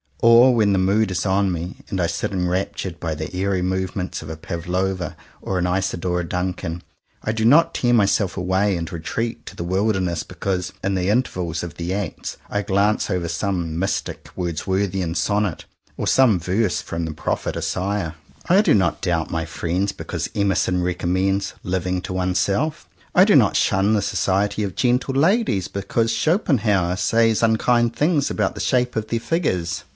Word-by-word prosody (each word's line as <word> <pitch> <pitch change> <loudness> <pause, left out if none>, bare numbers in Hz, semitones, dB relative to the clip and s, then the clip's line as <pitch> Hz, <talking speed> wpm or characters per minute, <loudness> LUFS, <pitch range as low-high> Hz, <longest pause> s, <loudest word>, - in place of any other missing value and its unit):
Or 120 +2 +7
when 105 -4 +3
the 95 - +2
mood 100 +3 +2
is 90 0 -2
on 95 0 +2
me 85 +1 -4
and 95 - -2
I - - +2
sit 85 +3 -2
enraptured 90 -1 -2
by 80 -2 -3
the 80 +4 -6
airy 95 -1 0
movements 95 0 -2
of 80 - -9
a 80 - -5
Pavlowa 90 +3 -3 0.3
or 95 - -2
an 90 - 0
Isadora 90 -1 -1
Duncan, 90 -1 -3 0.4
I 110 - 0
do 110 0 -2
not 165 +7 +5
tear 120 -1 +1
myself 100 -4 +2
away 95 +1 +1
and 85 -1 -5
retreat 115 +8 -4
to - - -8
the - - -4
wilderness 95 -2 0
because, 90 -2 -3
in 95 +1 0
the 95 0 0
intervals 90 -8 0
of 85 -4 -7
the 85 +2 -3
acts, 100 -4 -4
I 105 - 0
glance 100 +2 +1
over 90 -3 -1
some 85 -2 -2
mystic 95 +2 -3
Wordsworthian 90 +1 -1
sonnet, 100 +1 0 0.3
or - - -2
some 120 -8 +4
verse 95 +4 0
from 85 0 -4
the 80 - -4
Prophet 75 - -2
Isaiah. 95 -3 -2 0.3
I 190 +4 +5
do 215 - +4
not 95 -4 +1
doubt 85 -3 -1
my 80 -1 -1
friends 90 +4 -1
because - - -5
Emer 100 -2 +2
son 90 -1 +1
recommends 95 +2 0
"living 90 0 -1
to 95 - -5
oneself." 95 - 0 0.3
I - - +8
do - - +4
not - - +5
shun 95 +3 +2
the 105 - +2
society 100 +2 0
of 100 -3 -4
gentle 125 +2 +1
ladies 155 - +2
because 110 +4 -1
Schopenhauer 110 - +1
says 115 +2 +2
unkind 115 +1 +2
things 150 -2 +2
about - - 0
the - - -5
shape 125 -1 +1
of 110 -1 -2
their 115 +1 -1
figures. 110 - -1
95 Hz, 175 wpm, -22 LUFS, 90-110 Hz, 0.4 s, I